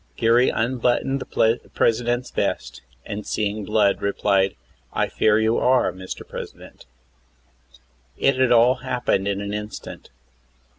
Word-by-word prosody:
Geary 120 +2 +4
unbuttoned 125 +3 0
the 115 -1 +1 0.2
President's 120 +2 +1
vest, - - -3 0.2
and, 105 +1 -5
seeing 105 0 -2
blood, 105 -1 +2
replied: 100 -1 +1 0.4
"I - - 0
fear 105 -1 +2
you 110 +1 +2
are, 125 -6 +3
Mr. 95 0 -8
President." - - -10 1.3
It 135 - +2
had 130 -1 +3
all 120 +2 +5
happened 125 -6 -1
in 100 0 -1
an 100 0 -4
instant. 105 0 -7
110 Hz, 120 wpm, -22 LUFS, 100-125 Hz, 1.3 s, all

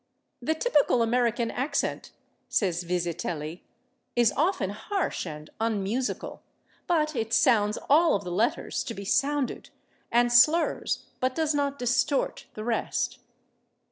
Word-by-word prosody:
"The 315 - 0
typical 295 - +2
American 235 0 +1
accent," 280 +3 -2 0.4
says 180 -4 +1
Vizetelly, 170 -2 -3 0.5
"is 240 -3 +4
often 295 - +1
harsh 385 - -3
and 150 0 -8
unmusical, 225 +3 -2 0.5
but 310 -3 +1
it 225 -1 -2
sounds 210 -3 +3
all 320 +3 +5
of 200 - -2
the 180 - -5
letters 215 +7 0
to 230 - -5
be 200 - -7
sounded, 280 +4 0 0.4
and 240 +1 +3
slurs, 305 +8 +3
but 255 0 0
does 315 -2 +1
not 280 -1 0
distort, 245 +3 0
the 215 - -5
rest." 235 0 -1
240 Hz, 125 wpm, -27 LUFS, 205-285 Hz, 0.5 s, all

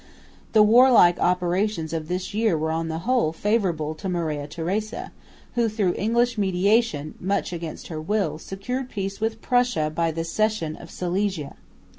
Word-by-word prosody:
The 215 -1 +7
warlike 230 -5 +6
operations 180 -1 0
of 160 -1 -3
this 180 +3 -3
year 215 -5 +2
were 160 +1 -1
on 165 0 -1
the 160 0 -3
whole 245 -10 +2
favourable 170 -5 0
to 175 +5 -6
Maria 155 -5 -2
Theresa, 190 +8 -3 0.4
who 235 -2 +1
through 205 -5 0
English 235 +2 +1
mediation, 190 -4 +1
much 190 -1 -1
against 165 -2 -6
her 155 -2 -5
will, 165 -3 -1
secured 250 +9 -5
peace 195 -1 -4
with 225 0 -2
Prussia 245 -11 +1
by 165 +1 +1
the 165 +1 -3
cession 200 -2 -1
of 170 - -12
Silesia. 180 -4 -2
185 Hz, 155 wpm, -24 LUFS, 165-215 Hz, 0.4 s, The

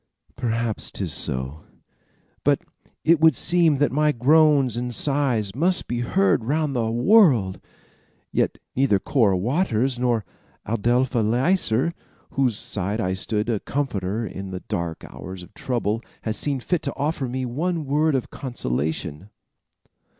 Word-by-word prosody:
"Perhaps 115 -3 -2
'tis 90 -6 -3
so; 70 -1 -2 0.8
but - - +2 0.4
it 160 -2 +5
seemed 170 0 +3
that 145 +1 +2
my 150 +3 +3
groans 145 -1 +4
and 120 0 -3
sighs 130 -8 0
must 175 - +1
be 120 - -2
heard 155 - +2
round 145 +3 0
the 115 -2 0
world, 120 - +4 0.7
yet - - 0 0.2
neither 130 -6 +3
Cora 100 -2 +2
Waters 125 - 0
nor 120 -4 +1 0.4
Adelpha 120 +3 +1
Leisler, 120 - +2
at - - -8 0.4
whose 125 -6 +1
side 100 +1 -3
I 95 -4 0
stood 105 +3 -1
a 115 -4 0
comforter 110 -6 -2
in 95 -2 -6
the 95 -1 -6
dark 85 -1 -4
hours 90 +4 -9
of 95 - -15
trouble, 115 -3 -2 0.2
has 110 -1 -1
seen 140 0 0
fit 175 +5 0
to 140 - -4
offer 145 -2 -1
me 130 +1 -3
one 160 +6 -2
word 150 +2 +2
of 130 - -2
consolation." 80 - -3
120 Hz, 140 wpm, -23 LUFS, 105-145 Hz, 0.8 s, it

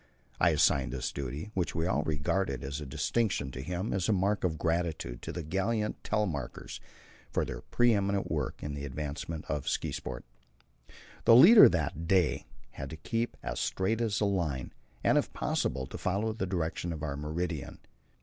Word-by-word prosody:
I 85 - +5
assigned 75 -5 +3
this 65 -1 -3
duty, 70 - -5
which 90 -4 -1
we 80 +1 0
all 90 -5 +1
regarded 75 -1 -1
as 70 +3 -4
a 75 - -6
distinction, 95 - 0
to 65 - -6
him 90 +8 -3
as 95 +1 0
a - - +5
mark 100 +2 +1
of 85 -4 0
gratitude 80 -7 -1
to - - -5
the 85 - -5
gallant 105 +7 -1
Telemarkers 90 - -2 0.5
for - - 0
their - - -6
pre 120 -1 +3
eminent 100 -1 0
work - - -2
in 75 - -3
the 70 0 -5
advancement 75 +3 -5
of 75 -3 -2
ski - - -1
spot. - - -5 1.0
The 115 - +8
leader 205 - +10
that 80 -1 -2
day 90 -3 +2 0.2
had 70 -1 -7
to 80 - -7
keep 115 +9 -2
as - - -3
straight 110 +5 0
as 110 -3 0
a 105 - +2
line, 85 -10 -1 0.3
and - - +5
if - - -3
possible 65 0 -1
to - - -8
follow 105 +4 0
the 105 -4 -3
direction 85 -1 -2
of 80 -2 -5
our 70 -2 -2
meridian. 80 0 -3
85 Hz, 180 wpm, -30 LUFS, 75-100 Hz, 1.0 s, leader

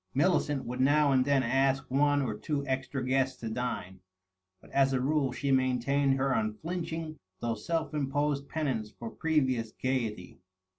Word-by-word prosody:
Millicent 145 -2 +2
would 125 +1 -5
now 145 +2 +4
and 130 -1 +3
then 140 -2 +3
ask 135 +2 +2
one 145 +1 +3
or 115 -5 -2
two 140 +6 -3
extra 130 0 -2
guests 130 0 +1
to 115 - -5
dine, 110 -6 -4 0.6
but - - -18
as 135 -1 +3
a 130 - +2
rule 140 0 +1
she 140 +2 -2
maintained 135 +1 +2
her 135 0 +1
unflinching 160 +7 -3 0.2
though 120 -1 -1
self 160 +8 -2
imposed 145 0 -1
penance 130 -9 -2
for 115 +1 -8
previous 130 -9 0
gayety. 115 -10 -3
135 Hz, 155 wpm, -30 LUFS, 125-145 Hz, 0.6 s, now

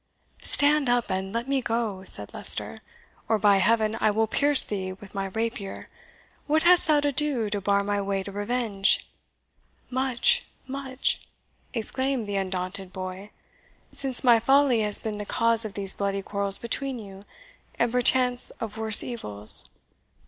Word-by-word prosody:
"Stand 290 -2 +2
up, 245 -3 0
and 190 +1 -3
let 230 +3 -4
me 275 -1 0
go," 225 -5 -3
said 105 - +1
Leicester, - - -2 0.5
"or, 220 - +2
by 205 -1 +3
Heaven, 220 +2 +1
I - - +3
will 220 +2 +1
pierce 285 +5 +5
thee 190 -2 -5
with 195 +1 -15
my 195 -1 -3
rapier! 220 0 -5 0.6
What 310 +2 +1
hast 355 0 +4
thou 300 -2 +3
to 290 0 0
do 265 -7 -1
to 205 -1 -3
bar 200 +1 +1
my 205 0 -2
way 195 -1 -3
to 200 - -9
revenge?" 205 -1 -1 0.8
"Much 260 - +1 0.2
much!" 265 0 -3 0.5
exclaimed 260 +1 -2
the 205 -1 -4
undaunted 185 0 -4
boy, 185 +2 -8 0.6
"since 270 -2 +4
my 240 -3 +5
folly 270 0 +3
has 210 -1 +4
been 215 -2 -6
the - - -4
cause 230 +2 0
of 210 - -8
these 195 -1 -1
bloody 200 -1 -3
quarrels 200 0 -3
between 265 +3 -4
you, 195 -3 -11 0.6
and 235 0 0
perchance 250 0 +5
of 220 -1 -7
worse 220 -1 +7
evils. 105 - +1
220 Hz, 155 wpm, -25 LUFS, 200-255 Hz, 0.8 s, worse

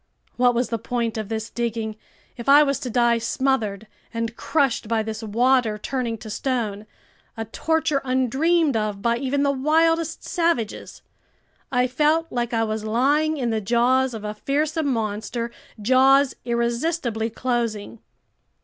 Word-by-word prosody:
What 245 0 +3
was 245 +1 0
the 230 - -2
point 235 0 -2
of 215 -2 -4
this 220 0 -4
digging 225 -2 -3 0.4
if 240 +2 -4
I 290 +2 +8
was 275 -1 0
to 255 - -5
die 235 0 +3
smothered 230 -4 -1 0.3
and 230 0 -3
crushed 270 -7 0
by 225 -1 +1
this 220 0 -5
water 230 +1 +2
turning 235 0 -3
to 220 0 -10
stone, 215 -4 -2 0.5
a 225 - -3
torture 315 +4 0
undreamed 270 +4 +2
of 210 -2 -2
by 235 0 +2
even 275 +2 0
the 280 - +3
wildest 325 +4 +1
savages! 335 - -2 0.7
I 250 -1 +3
felt 305 +6 +1
like 240 -1 -2
I 225 -1 +1
was 215 -1 -2
lying 285 +8 +2
in 245 -4 -1
the 220 -1 -1
jaws 245 +4 +2
of 215 - -7
a 210 0 -3
fearsome 295 +7 -1
monster, 230 0 -2 0.3
jaws 265 +4 +4
irresistibly 235 0 -1
closing. 230 -3 -2
240 Hz, 150 wpm, -23 LUFS, 225-275 Hz, 0.7 s, I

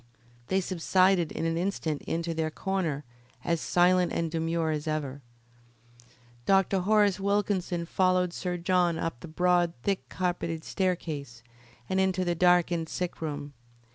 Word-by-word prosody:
They 190 +1 +1
subsided 185 -1 +2
in - - -3
an 165 0 0
instant 170 -5 -2
into 165 0 -1
their 160 -1 -1
corner 165 -4 -2 0.4
as 170 -2 0
silent 180 0 +3
and 165 -1 -1
demure 165 0 0
as 150 0 -3
ever. 145 -3 -3 1.3
Dr. 195 0 +3
Horace 205 +1 +3
Wilkinson 195 -3 0
followed 185 0 +2
Sir 180 -1 -3
John 175 -1 +2
up 165 -6 -3
the 170 - -9
broad, 175 +1 +2
thick 195 -1 -1
carpeted 175 -3 -2
staircase, 150 -10 -3 0.4
and 190 - 0
into 190 -1 +1
the 175 - +1
darkened 175 -1 +3
sick 180 -2 -4
room. 145 -2 -4
175 Hz, 140 wpm, -28 LUFS, 160-185 Hz, 1.3 s, silent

